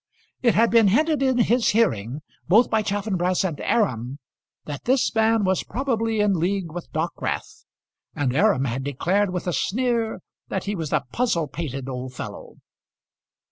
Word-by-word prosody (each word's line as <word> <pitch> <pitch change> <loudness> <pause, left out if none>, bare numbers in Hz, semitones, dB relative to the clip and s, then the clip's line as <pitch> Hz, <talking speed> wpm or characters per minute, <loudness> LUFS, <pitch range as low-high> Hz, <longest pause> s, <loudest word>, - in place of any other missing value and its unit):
It 235 -4 +3
had 230 +2 +4
been 230 -3 +6
hinted 300 +8 +2
in 260 -2 +2
his 240 0 +3
hearing, 145 - +1 0.3
both 220 +7 +4
by 220 - +3
Chaffanbrass 195 -3 0
and 170 -6 -2
Aram, 130 - 0 0.5
that 145 -2 -7
this 260 +1 +2
man 225 -1 +3
was 190 -1 +1
probably 225 -3 -1
in 200 -4 +2
league 180 0 -1
with 175 +1 -8
Dockwrath, 160 +2 -3 0.5
and 135 -3 -1
Aram 195 -8 +3
had 130 +1 -2
declared 180 +9 0
with 180 -2 -3
a 180 - -1
sneer 230 - 0 0.3
that 190 - -3
he 205 - -2
was 160 -6 -4
a - - +1
puzzle 200 -11 0
pated 135 -3 -5
old 130 -1 -6
fellow. - - -8
195 Hz, 160 wpm, -23 LUFS, 150-225 Hz, 0.5 s, been